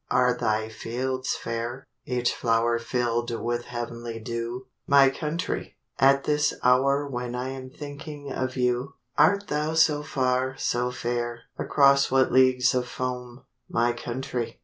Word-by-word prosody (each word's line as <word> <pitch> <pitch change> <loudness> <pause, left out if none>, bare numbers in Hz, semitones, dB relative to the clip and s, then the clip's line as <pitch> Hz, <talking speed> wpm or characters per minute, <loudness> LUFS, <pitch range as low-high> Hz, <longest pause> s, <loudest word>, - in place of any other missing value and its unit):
Are 125 -1 +3
thy 110 -2 0
fields 130 +4 -3
fair—each 120 +1 -3
flower 115 0 +1
Fill'd 120 0 -1
with 120 +1 -1
the - - -16
heav'nly 120 -1 -5
dew, 115 +2 -4 0.2
My 140 -1 +6
country, 155 +5 -4 0.2
at 135 +1 +5
this 150 0 +1
hour 140 +3 +3
When 125 -2 -4
I 125 +1 -3
am 130 -1 -7
thinking 145 0 -8
of 130 0 -3
you? 125 +2 0 0.2
Art 200 +5 +4
thou 150 +2 -1
so 155 -2 +4
far, 130 -2 0
so 125 -1 0
fair? 120 -1 -3 0.2
Across 140 -1 +4
what 130 0 +3
leagues 130 -1 +4
of 125 -1 0
foam, 125 0 -5 0.3
My 120 +1 +2
country? 120 0 -4
125 Hz, 140 wpm, -26 LUFS, 120-135 Hz, 0.3 s, My